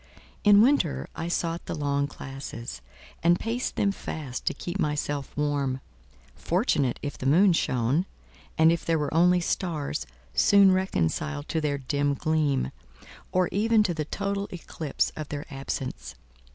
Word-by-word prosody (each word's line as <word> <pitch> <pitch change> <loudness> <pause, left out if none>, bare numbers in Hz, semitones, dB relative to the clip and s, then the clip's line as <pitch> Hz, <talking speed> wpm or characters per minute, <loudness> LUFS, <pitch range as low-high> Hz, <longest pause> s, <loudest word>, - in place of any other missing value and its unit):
In 205 0 +7
winter 250 - +2
I 165 - -3
sought 170 -1 -2
the - - -3
long 140 -1 0
classes, 135 - -7 0.4
and 175 +1 +4
paced 235 +3 -2
them 200 - +2
fast 145 -9 -6
to - - +2
keep 175 +3 -5
myself 145 -3 -1
warm—fortunate 135 - -1
if 145 -1 -5
the 130 - -2
moon 180 +6 +5
shone, 130 +4 +1 0.5
and 160 +1 +6
if 170 - -1
there 165 -1 +1
were 150 -1 -2
only 180 +2 +4
stars, 165 -4 -2 0.3
soon 195 - +6
reconciled 80 - -1
to 160 - 0
their 145 -2 0
dim 140 +1 0
gleam, 150 - 0 0.6
or 185 -1 +2
even 220 +2 +3
to 185 -4 0
the 155 -2 -3
total 200 +4 -2
eclipse 160 -4 -2
of 155 -2 -6
their 145 0 -4
absence. 125 - -5
155 Hz, 145 wpm, -27 LUFS, 135-180 Hz, 0.6 s, In